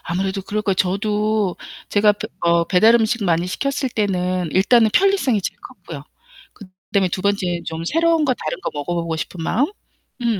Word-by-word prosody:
아무래도 190 +3 -2
그럴 210 +2 -3
거예요. 195 -2 +1
저도 210 +1 0 0.3
제가 210 0 +4
브 205 +1 -6
어 170 0 +3
배달 210 +6 +4
음식 230 0 +1
많이 170 0 +1
시켰을 275 +7 -2
때는 185 -4 -1
일단은 220 +4 +4
편리성이 380 - +3
제일 - - -4
컸고요. - - -10 0.5
그다음에 185 -1 -3
2 185 - -3
번째엔 185 -4 -1
좀 160 0 -5
새로운 330 - +2
거 260 - +2
다른 155 - -5
거 - - -2
먹어 145 +4 -3
보고 170 -1 -2
싶은 165 +2 -6
마음 250 - +1 0.5
음 230 -4 0
200 Hz, 360 characters per minute, -20 LUFS, 180-220 Hz, 0.5 s, 제가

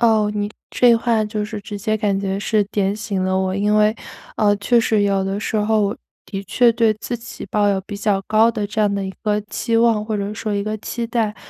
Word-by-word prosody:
哦， 220 -3 +3
你 205 0 -2 0.2
这 240 -2 +4
话 230 -2 +1
就 210 0 -3
是 210 0 -6
直 205 0 -7
接 215 +1 0
感 205 -2 0
觉 195 0 -2
是 210 0 +1
点 200 -1 -1
醒 205 -3 -3
了 185 0 +1
我。 190 0 -1
因 205 +1 +1
为， 215 0 +4 0.4
呃， 205 -1 +3
确 235 +4 +3
实 220 -2 +2
有 195 -1 +1
的 195 +1 -2
时 215 +1 -2
候， 215 +1 +2
我 200 0 0 0.3
的 195 -1 -5
确 240 +3 +3
对 225 -1 +3
自 240 +3 -5
己 235 +1 -9
抱 205 -1 +2
有 195 -1 +1
比 205 +2 -7
较 200 -1 +1
高 220 +2 +4
的 210 -3 -3
这 215 +1 -3
样 205 -1 +2
的 200 -1 -2
一 190 - -6
个 210 -1 +1
期 225 +2 -2
望 225 -2 +3
或 215 -1 -2
者 200 +1 -3
说 215 -1 -3
一 200 0 -1
个 215 +1 -2
期 235 +2 -4
待。 225 -2 -1
210 Hz, 260 characters per minute, -20 LUFS, 200-220 Hz, 0.4 s, 这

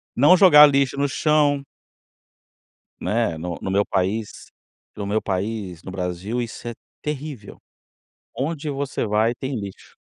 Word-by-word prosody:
Não 145 +9 +6
jogar 170 -6 +9
lixo 140 -1 +1
no 140 0 +1
chão. 145 -1 +2 1.4
Né, 110 -6 0
no 85 +1 -5
no 95 - -4
meu 100 +2 +2
país, 100 +3 -2 0.5
no 100 - -4
meu 105 +2 0
país, 95 -3 -4
no - - -8
Brasil, 95 +5 -3
isso 120 0 -6
é - - -4 0.3
terrível. 145 -7 -6 0.8
Onde 150 +4 -3
você 140 -3 -2
vai 110 +3 +1
tem 130 0 -4
lixo. 100 -2 -10
115 Hz, 135 wpm, -22 LUFS, 100-140 Hz, 1.4 s, jogar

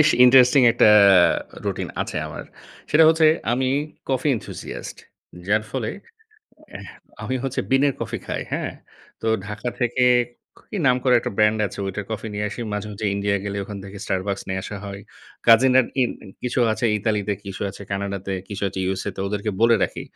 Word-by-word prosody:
বেশ 150 - +6 0.2
ইন্টারেস্টিং 125 +1 +6
একটা - - +5 0.8
রুটিন - - -3
আছে - - -6
আমার। - - -7 0.5
সেটা 160 +1 +6
হচ্ছে 160 -1 +4 0.3
আমি 130 +1 0 0.4
কফি 135 +2 0
এনথুসিয়াস্ট। - - -8 0.5
যার 105 +2 +2
ফলে 120 -5 -2 0.8
অ্যাহ - - -9 0.4
আমি 130 - -3
হচ্ছে 135 -1 -1
বিনের 135 +1 +3
কফি 115 0 -3
খাই। - - -3
হ্যাঁ? - - -2 0.5
তো - - -3 0.2
ঢাকা 105 +3 -5
থেকে, 125 +1 +1 0.7
কি - - -4
নাম 125 -2 +5
করা 125 -1 +4
একটা - - -4
ব্র্যান্ড 105 +1 +3
আছে, 95 - -10
ওইটার 95 +2 -4
কফি 110 0 -4
নিয়ে 105 0 -2
আসি। 110 - -7
মাঝে, 105 0 -3
মাঝে 105 +1 -4
ইন্ডিয়া 100 0 0
গেলে 100 0 -4
ওখান 100 0 -7
থেকে 100 0 -9
Starbucks 95 +1 -2
নিয়ে 95 0 -2
আসা 100 - -6
হয়। 100 0 -7 0.5
কাজিনরা 125 +3 +6 0.2
ইন 125 - +1 0.3
কিছু 125 +1 -2
আছে 110 - -3
ইতালিতে, 105 -1 -1
কিছু 100 -1 -6
আছে 100 - -11
কানাডাতে, 100 -1 -3 0.2
কিছু 100 0 -6
আছে 95 - -7
USA 95 +1 -3
তে, - - -5
ওদেরকে 105 +1 -2
বলে 115 0 +5
রাখি। - - -2
110 Hz, 175 wpm, -22 LUFS, 100-125 Hz, 0.8 s, বেশ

